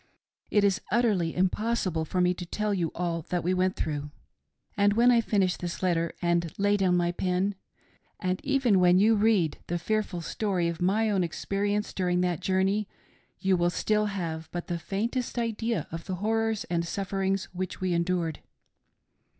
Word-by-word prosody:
It 205 - +3
is 200 +1 +2
utterly 210 -8 +2
impossible 185 -3 0
for 180 +3 -1
me 180 0 +3
to 180 - -7
tell 210 +3 -1
you 170 -5 -1
all 170 -1 -1
that 175 -1 -1
we 180 +2 +1
went 185 0 +1
through. 150 -1 -3 0.7
And 205 -1 +3
when 240 +3 +5
I 235 -1 +5
finish 195 -5 +1
this 175 +1 -5
letter 170 -2 +1
and 170 -1 +1
lay 205 +1 +3
down 185 -3 +2
my 175 0 +1
pen, 185 +2 0 0.7
and 185 -1 -2
even 265 -8 +3
when 180 0 +5
you 215 +4 +5
read 205 -7 +2
the 175 - -1
fearful 205 0 -1
story 180 0 -1
of 170 0 -4
my 210 +4 +2
own 195 -3 +2
experience 205 +4 -2
during 180 -1 +1
that 175 -3 0
jour 190 0 +1
ney, 200 +2 0 0.5
you 190 -1 +2
will 175 0 +2
still 210 +4 +1
have 165 -5 -4
but 175 0 -4
the 170 -1 -3
faintest 235 +8 -2
idea 230 -5 -1
of 165 +1 -6
the 185 - -3
horrors 220 +2 0
and 170 -1 -1
sufferings 195 +1 -1
which 185 0 -4
we 185 -1 0
endured. 170 -2 0
185 Hz, 175 wpm, -28 LUFS, 175-210 Hz, 0.7 s, when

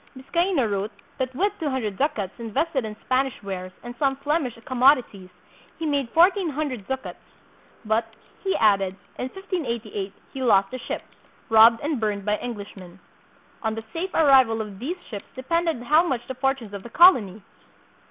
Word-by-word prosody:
Biscaino 340 +1 +1
wrote 200 0 -2 0.3
that 260 -1 -2
with 400 +7 +1
two 315 -4 -1
hundred 230 -7 -2
ducats 220 -7 -1
invested 250 +4 -1
in 215 -1 -6
Spanish 260 0 +1
wares 185 -2 -5
and 240 0 -7
some 275 -2 +2
Flemish 280 -3 -1
commodities, 250 -7 +3 0.5
he 325 - -4
made 285 -5 0
fourteen 355 - +4
hundred 275 -8 -4
ducats; 265 0 -5 0.7
but, 225 +1 0 0.3
he 385 -1 0
added, 195 -3 +3 0.2
in - - -1
1588 235 - -4 0.2
he 270 - -5
lost 200 -4 +3
a 255 - -4
ship, - - -5 0.5
robbed 225 +1 +7
and 290 -3 -1
burned 205 -2 -1
by 210 0 +1
Englishmen. 200 -6 -8 0.6
On 220 -1 -1
the 225 - -6
safe 350 +3 -2
arrival 265 -7 +5
of 210 -3 -6
these 315 +10 -3
ships 205 -3 -7
depended 325 0 -1
how 300 +6 +5
much 260 -5 -1
of - - -22
the - - -2
fortunes 260 -5 -2
of 200 - -6
the 235 - -10
colony! 225 - +5
250 Hz, 165 wpm, -24 LUFS, 210-290 Hz, 0.7 s, robbed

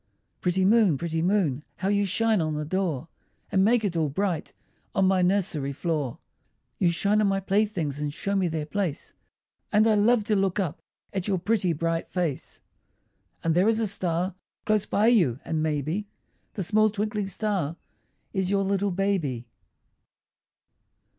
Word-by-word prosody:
Pretty 185 +1 +1
moon, 205 -7 +4
pretty 165 +1 -2
moon, 170 -7 +1
How 190 - -3
you 200 0 +2
shine 220 +1 +2
on 155 -1 -1
the 150 0 -3
door, 165 -4 -1 0.4
And 190 - +3
make 225 +2 +3
it 190 -4 -1
all 160 -3 +1
bright 180 +2 -2 0.4
On 195 - +3
my 190 -1 +3
nursery 180 -7 +1
floor! 150 -5 -2 0.6
You 175 - +4
shine 200 +5 +2
on 210 - +3
my 195 0 +1
playthings, 190 -7 0
And 150 -1 -2
show 200 +7 -3
me 190 -2 +2
their 160 -2 -2
place, 180 -2 -3 0.6
And 215 +1 +4
I 225 - +4
love 215 +2 +3
to 210 +1 +1
look 195 0 +1
up 170 -5 -2 0.3
At 190 -1 -2
your 195 -2 +1
pretty 185 0 +1
bright 165 +1 -1
face. 170 -7 -3 0.8
And 165 - +2
there 185 +6 +4
is 225 0 +2
a 225 - +1
star 185 -2 -1 0.3
Close 215 -2 +1
by 205 - +2
you, 185 - +4
and 160 -1 -1
maybe 155 +6 -1 0.5
That 195 - -2
small 215 +4 +3
twinkling 210 -1 -2
star 195 -5 -2 0.6
Is 190 -2 0
your 200 0 +2
little 200 +1 0
baby. 175 -11 -1
190 Hz, 165 wpm, -26 LUFS, 165-205 Hz, 0.8 s, moon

